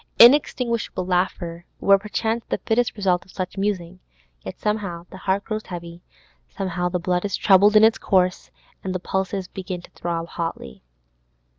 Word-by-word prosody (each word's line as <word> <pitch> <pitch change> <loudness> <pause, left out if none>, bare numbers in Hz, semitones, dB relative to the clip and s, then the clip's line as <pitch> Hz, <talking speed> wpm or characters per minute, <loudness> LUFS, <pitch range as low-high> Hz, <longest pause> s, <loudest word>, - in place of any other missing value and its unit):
Inextinguishable 235 -6 +4
laughter 175 -2 -1 0.2
were 195 0 +5
perchance 220 +2 -2
the - - 0
fittest 235 +1 +1
result 185 -3 +1
of - - -25
such 185 0 -5
musing; 190 -3 -2 0.4
yet 95 - -8
somehow 200 -5 -2
the - - -9
heart 195 +1 0
grows 215 -1 -4
heavy, 170 -1 -8 0.5
somehow 180 -2 -2
the 180 - -1
blood 180 0 -1
is 205 - -1
troubled 200 +2 +5
in 215 - +8
its 225 0 +5
course, 185 -2 +1 0.3
and 185 -1 -3
the - - -1
pulses 190 +1 -2
begin 185 -2 -6
to - - -15
throb 170 -1 -4
hotly. 165 - -5
185 Hz, 160 wpm, -23 LUFS, 175-210 Hz, 0.5 s, in